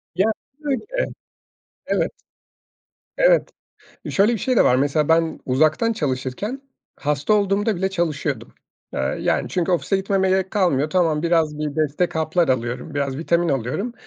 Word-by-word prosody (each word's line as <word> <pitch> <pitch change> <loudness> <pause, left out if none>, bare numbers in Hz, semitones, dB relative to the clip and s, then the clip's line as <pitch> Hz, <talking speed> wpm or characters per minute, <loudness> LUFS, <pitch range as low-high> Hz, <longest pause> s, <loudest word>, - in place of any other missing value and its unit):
Ya, 195 +5 +3 0.3
böyle. 290 +2 -2 1.0
Evet, - - 0 1.1
evet, - - +4 0.6
şöyle 205 +4 +3
bir - - -1
şey 255 +6 0
de - - +6
var: 125 - +4
Mesela 145 +3 +1
ben 165 0 +2
uzaktan 155 - +2
çalışırken 145 - -3 0.4
hasta 150 +6 0
olduğumda 205 +1 +2
bile 190 +2 0
çalışıyordum, 150 - -2 0.4
aaa, - - -3
yani. - - -1
Çünkü 180 0 0
ofise 180 +3 +1
gitmeme 190 0 +1
gerek 190 0 +1
kalmıyor. 155 -8 +1
Tamam, 165 -3 +2
biraz 165 -3 +2
bir 150 -1 -3
destek 155 +3 0
haplar 160 +1 +1
alıyorum. 125 +4 -2
Biraz 140 -2 -2
vitamin 170 +2 +1
alıyorum 140 - -2
165 Hz, 140 wpm, -22 LUFS, 145-195 Hz, 1.1 s, de